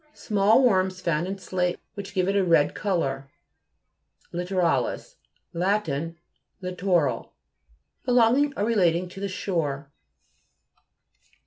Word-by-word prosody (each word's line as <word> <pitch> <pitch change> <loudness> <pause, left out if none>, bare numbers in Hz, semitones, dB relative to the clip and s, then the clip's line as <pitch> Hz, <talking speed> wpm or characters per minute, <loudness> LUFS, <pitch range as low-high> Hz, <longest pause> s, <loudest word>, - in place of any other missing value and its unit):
Small 215 +4 +3
worms 190 -5 +2
found 170 -1 0
in 195 +1 -4
slate 180 -1 -2
which 200 -1 -8
give 185 -1 +1
it 200 - +1
a 200 - +3
red 165 -5 +3
co 195 -3 -1
lour. 135 -3 -3 1.0
LITTORA'LIS 180 - -1 0.4
Lat. 190 +3 +1 0.7
Littoral; 180 -8 -1 0.7
be 250 - -1
longing 250 +4 +4
or 205 - +1
relating 180 -6 +2
to 195 - -10
the 200 0 -3
shore. 155 -8 -3
185 Hz, 115 wpm, -25 LUFS, 170-200 Hz, 1.0 s, longing